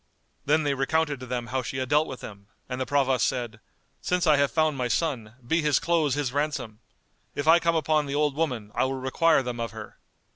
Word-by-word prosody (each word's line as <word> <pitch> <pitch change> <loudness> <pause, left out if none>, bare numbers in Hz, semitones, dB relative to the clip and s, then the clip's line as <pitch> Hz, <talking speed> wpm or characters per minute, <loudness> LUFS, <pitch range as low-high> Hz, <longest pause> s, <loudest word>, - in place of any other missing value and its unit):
Then 155 +2 +3
they 145 -1 +1
recounted 145 +1 0
to 130 - -9
them 120 -1 -3
how 130 - +1
she 130 +2 -5
had 130 0 -2
dealt 150 +2 +3
with 130 - -8
them, 100 -2 -10 0.2
and 125 0 -4
the 130 - -2
Provost 135 -3 +2
said, 120 -4 -4 0.4
"Since 180 0 0
I 155 -3 +5
have 140 0 +3
found 155 -2 +1
my 125 -2 -1
son, 120 -5 -2
be 165 +7 +1
his 150 -3 +3
clothes 160 -4 +1
his 140 -4 -2
ransom! 145 -7 -2 0.6
If 145 - -3
I 165 +2 +7
come 170 0 +1
upon 155 -2 +1
the 140 - -3
old 150 -1 +1
woman, 125 -10 -2
I - - +1
will 135 +1 -2
require 140 +3 +2
them 120 -1 -5
of 115 0 -2
her." 110 -1 -10
140 Hz, 225 wpm, -26 LUFS, 125-155 Hz, 0.6 s, I